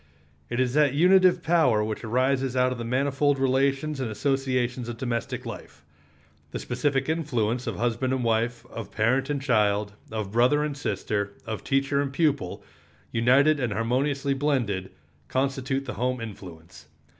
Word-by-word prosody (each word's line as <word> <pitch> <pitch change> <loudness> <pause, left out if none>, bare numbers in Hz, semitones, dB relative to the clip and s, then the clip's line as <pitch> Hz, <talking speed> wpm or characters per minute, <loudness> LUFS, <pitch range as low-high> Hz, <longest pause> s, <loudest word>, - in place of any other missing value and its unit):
It 120 - -2
is 125 -1 +1
that 145 -2 +3
unitive 185 +3 +5
power 155 -10 +3
which 110 +1 -4
arises 130 +2 0
out 125 0 +3
of 125 - -4
the - - -3
manifold 135 +3 +1
relations 135 +2 +1
and 130 -4 -2
associations 125 0 -1
of 120 - -5
domestic 115 -1 -3
life. - - -9 0.6
The - - -5
specific 135 +1 -1
influence 125 -7 -1
of - - -2
husband 120 +3 -1
and 130 -1 0
wife, 115 +1 0
of 115 - -7
parent 130 +5 +1
and 145 -1 0
child, 105 -6 +1 0.2
of 110 -3 -4
brother 125 +6 +3
and 150 -2 -2
sister, 100 -5 -2
of 110 -2 -5
teacher 135 +1 +1
and 140 -1 -2
pupil, 140 - 0 0.5
united 135 +6 +4
and 120 -5 -1
harmoniously 135 +6 0
blended, 125 -10 -1 0.4
constitute 135 - -1
the - - -5
home 125 +3 -1
influence. 85 -7 -10
130 Hz, 155 wpm, -26 LUFS, 115-140 Hz, 0.6 s, unitive